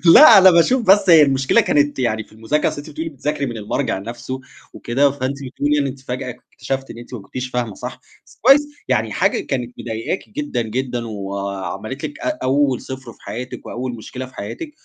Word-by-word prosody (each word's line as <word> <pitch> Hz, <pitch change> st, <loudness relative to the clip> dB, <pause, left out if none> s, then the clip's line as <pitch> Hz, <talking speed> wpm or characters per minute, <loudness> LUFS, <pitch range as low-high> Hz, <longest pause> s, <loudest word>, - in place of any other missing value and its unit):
لأ، 235 Hz, -9 st, +10 dB
أنا 190 Hz, -1 st, +8 dB
باشوف 235 Hz, +10 st, +4 dB
بس 195 Hz, -2 st, +4 dB
هي 160 Hz, -2 st, +9 dB
المشكلة 135 Hz, -2 st, +4 dB
كانت 145 Hz, -2 st, +1 dB
يعني 110 Hz, -3 st, 0 dB
في -, -, -26 dB
المذاكرة، 115 Hz, +8 st, 0 dB
أصل -, -, -7 dB
أنتِ 145 Hz, +2 st, -8 dB
بتقولي 160 Hz, +2 st, -4 dB
بتذاكري 145 Hz, 0 st, -2 dB
من 120 Hz, -3 st, -5 dB
المرجع 110 Hz, +1 st, -2 dB
نَفْسه 120 Hz, +5 st, -6 dB, 0.3 s
وكده، 135 Hz, +4 st, +1 dB
فأنتِ 135 Hz, -1 st, -2 dB
بتقولي 145 Hz, +3 st, 0 dB
إن 140 Hz, -, +1 dB
أنتِ 135 Hz, 0 st, -6 dB
فجأة 130 Hz, 0 st, -5 dB, 0.2 s
اكتشفتِ 135 Hz, 0 st, -4 dB
إن -, -, -11 dB
أنتِ 120 Hz, +1 st, -11 dB
ما 115 Hz, -, -6 dB
كنتيش 125 Hz, +5 st, -6 dB
فاهمة 120 Hz, -4 st, -2 dB
صح، -, -, -7 dB, 0.3 s
بس -, -, -21 dB
كويس، 270 Hz, +4 st, +7 dB, 0.3 s
يعني -, -, +1 dB
حاجة -, -, +1 dB
كانت 125 Hz, -3 st, -3 dB
مضايقاكِ 115 Hz, +10 st, -4 dB
جدًا، 290 Hz, -, -2 dB
جدًا 120 Hz, +1 st, -3 dB
وعملت 100 Hz, +3 st, -5 dB
لِك 310 Hz, +2 st, -7 dB
أ 310 Hz, -1 st, -2 dB
أول 135 Hz, -1 st, +2 dB
0 130 Hz, -3 st, -8 dB
في -, -, -25 dB
حياتِك 125 Hz, +2 st, -7 dB
وأول 125 Hz, 0 st, -4 dB
مشكلة 125 Hz, +3 st, -7 dB
في 130 Hz, -, -16 dB
حياتِك 300 Hz, -, -6 dB
130 Hz, 200 wpm, -20 LUFS, 120-145 Hz, 0.3 s, لأ